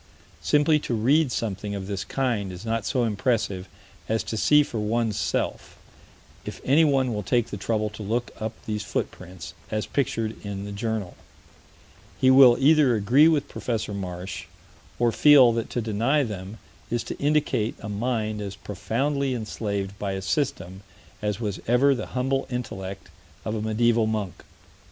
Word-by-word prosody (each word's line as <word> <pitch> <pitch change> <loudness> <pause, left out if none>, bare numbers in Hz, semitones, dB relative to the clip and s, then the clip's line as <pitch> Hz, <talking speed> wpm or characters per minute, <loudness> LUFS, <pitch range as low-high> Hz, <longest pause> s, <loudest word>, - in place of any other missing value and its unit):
Simply 150 +1 +3
to 125 - -2
read 135 +6 +3
something 105 -3 -3
of 95 -1 -5
this 100 -1 -3
kind 120 -8 -1
is 90 +4 -9
not 115 -1 -1
so 125 -3 +1
impressive 105 -4 -1 0.4
as 110 0 +1
to - - -4
see 150 +7 +5
for 120 -5 -5
one's 110 0 0
self: - - -2 0.7
if - - -7
anyone 135 -3 +3
will 105 - -2
take 120 +3 0
the - - -3
trouble 105 +1 -1
to 105 - -10
look 115 +4 -2
up 110 0 -3
these 105 -1 -2
footprints, 90 -3 -5 0.2
as 110 -1 -2
pictured 115 -5 -2
in 100 -1 -5
the 100 - -6
Journal, 105 -2 -3 1.0
he 130 - +5
will 130 -2 +8
either 145 -3 +5
agree 120 +9 +5
with 155 -4 +2
Prof. 115 -4 -3
Marsh 95 -2 -5 0.5
or 120 -1 +2
feel 140 -2 +7
that 115 0 -2
to 120 - -2
deny 115 +7 +1
them 100 -2 -6 0.3
is 120 0 -1
to - - -7
indicate 140 -6 +1
a - - -7
mind 110 0 -2
as 100 -1 -5
profoundly 130 +8 -2
enslaved 100 -3 -4
by 100 -2 -2
a 95 - -3
system 95 - -2 0.4
as 105 -1 -2
was 105 -4 -3
ever 130 +4 +4
the 115 -5 -4
humble 135 +1 0
intellect 100 -6 -5 0.4
of 110 - -2
a 110 - -2
medieval 110 +1 +2
monk. 105 -4 -3
110 Hz, 160 wpm, -25 LUFS, 100-125 Hz, 1.0 s, will